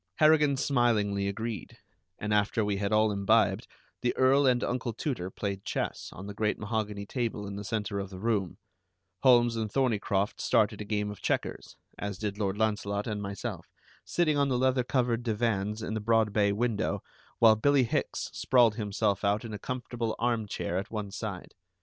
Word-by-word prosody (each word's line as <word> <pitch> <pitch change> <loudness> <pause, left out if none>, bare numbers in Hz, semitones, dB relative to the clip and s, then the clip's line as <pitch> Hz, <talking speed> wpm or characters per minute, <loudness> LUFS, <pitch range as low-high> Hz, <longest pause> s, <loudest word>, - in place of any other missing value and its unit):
Harrigan 150 -3 +4
smilingly 110 -8 +1
agreed, 110 +2 -5 0.4
and 105 0 -2
after 105 +1 +2
we 100 -1 0
had 100 +1 -1
all 110 0 +4
imbibed, 100 -1 +2 0.3
the 125 - 0
Earl 135 +2 +5
and 125 -1 +3
Uncle 125 -1 -2
Tooter 110 - -3
played 100 0 -4
chess - - -3
on 95 - -9
the 100 - -6
great 105 +1 0
mahogany 105 -1 -3
table 115 -2 -3
in 100 0 -6
the 100 - -5
center 105 0 -2
of 100 -1 -4
the 95 - -9
room; 100 -3 -1 0.6
Holmes 120 -2 +5
and 110 -2 -2
Thorneycroft 105 -6 0
started - - +2
a - - -5
game 105 0 -1
of 105 - -10
checkers, - - -2 0.2
as 100 -2 -4
did 105 -1 -4
Lord 100 -1 -1
Launcelot 105 -2 0
and 105 -2 -3
myself, 100 -1 -5 0.4
sitting 155 -4 +1
on 140 -1 +2
the 125 - +1
leather 130 0 +2
covered 120 -2 0
divans 110 -2 -1
in 110 - -3
the 110 - -1
broad 110 -1 +2
bay 100 -1 +3
window, 110 0 -1 0.3
while 110 -1 +7
Billie 140 +4 +3
Hicks 115 - -2
sprawled 120 -4 +4
himself 100 -2 0
out 100 +2 +1
in 110 - -6
a 105 - -5
comfortable 120 -3 -3
arm 115 -2 0
chair 90 -2 -2
at 100 - -6
one 105 -3 -4
side. 100 -3 -6
110 Hz, 180 wpm, -29 LUFS, 100-120 Hz, 0.6 s, while